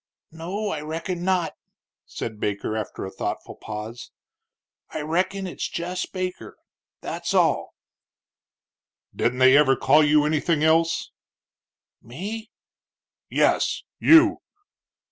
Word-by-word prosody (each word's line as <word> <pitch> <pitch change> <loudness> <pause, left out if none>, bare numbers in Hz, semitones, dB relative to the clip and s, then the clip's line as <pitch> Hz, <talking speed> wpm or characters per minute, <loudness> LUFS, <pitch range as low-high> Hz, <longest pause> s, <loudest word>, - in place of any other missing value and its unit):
"No, 185 +6 -4
I 155 -6 -3
reckin 165 +3 -4
not," 185 -3 +1 0.5
said 110 -2 -6
Baker, 105 +1 -2
after 110 -3 -4
a 95 - -7
thoughtful - - -4
pause. 110 +2 -7 0.8
"I - - -5
reckin 185 +5 -1
it's 180 - -4
jess 180 +2 -3
Baker 180 - -5 0.4
that's - - -3
all." - - +2 1.4
"Didn't 125 +1 0
they 130 +1 +6
ever 140 -2 +5
call 150 +4 +4
you 150 0 +4
anything 155 +1 +1
else?" 165 +1 +2 0.9
"Me?" 205 - -7 0.8
"Yes, - - +1 0.2
you." 325 0 +6
160 Hz, 105 wpm, -24 LUFS, 130-185 Hz, 1.4 s, they